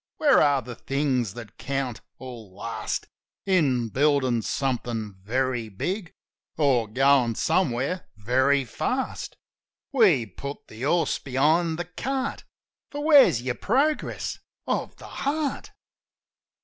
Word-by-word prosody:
Where 290 -4 +5
are 140 -3 +3
the 125 +1 -7
things 130 -6 -1
that 115 -4 -10
count 135 -4 -3 0.2
or 120 -4 -9
last 105 +5 -4 0.4
In 140 - +2
building 130 -2 +2
something 120 -4 -2
very 120 +2 -1
big 175 - -4 0.4
Or 135 -7 +3
goin' 130 0 +3
somewhere 160 - 0
very 130 +6 +2
fast? 255 - -3 0.5
We 195 - +4
put 140 +8 -8
the 110 - -11
horse 165 +5 +1
behind 155 +5 +2
the 175 - -3
cart; 265 +10 -3 0.4
For 290 0 -5
where's 265 - +6
your 125 -1 -1
progress 275 - 0 0.3
of - - -2
the - - -13
heart? 290 +1 -2
135 Hz, 115 wpm, -25 LUFS, 120-175 Hz, 0.5 s, where's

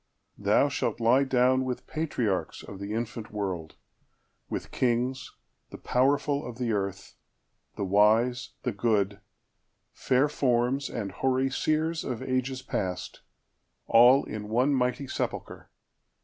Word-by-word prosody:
Thou - - +3
shalt - - -2
lie 120 +4 +4
downWith 130 -1 +1
patriarchs 115 - -2
of 100 - -9
the 100 +1 -5
infant 115 0 -4
world,—with 95 -6 -7
kings, 125 +1 -1 0.3
The - - -9
powerful 140 +3 +1
of 120 -2 -7
the 125 -2 -1
earth,—the 100 0 -7
wise, 110 +5 +3
the 125 - 0
good, 100 -2 0 0.7
Fair 130 +3 +2
forms, 130 -1 0
and 105 -5 -4
hoary 130 +5 0
seers 155 +3 0
of 125 -1 -4
ages 130 0 -2
past, 90 -2 -4 0.6
All 125 +4 +6
in 105 -1 -6
one 125 +6 +2
mighty 125 +1 0
sepulchre. - - -4
125 Hz, 115 wpm, -28 LUFS, 105-130 Hz, 0.7 s, All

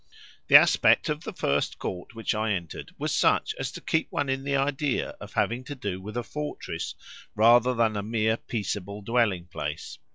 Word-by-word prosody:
The - - +5
aspect - - +6
of 150 +2 -2
the 220 - -4
first 75 - -1
court 95 +4 -6
which 115 +1 -1
I 110 0 0
entered 85 -4 -5
was - - -2
such - - +2
as - - -3
to - - -8
keep 160 - -1
one 145 -2 -1
in 135 0 -1
the 140 0 -1
idea 140 0 0
of - - -10
having 120 +3 0
to 145 - -6
do 100 -7 -4
with 105 +4 -7
a 120 - -1
fortress 150 +4 -5 0.4
rather 120 +3 +5
than 115 -2 +2
a 100 - -1
mere 110 +1 0
peaceable 100 -3 -4
dwelling 105 -6 +1
place. 75 -3 -6
115 Hz, 190 wpm, -27 LUFS, 100-135 Hz, 0.4 s, aspect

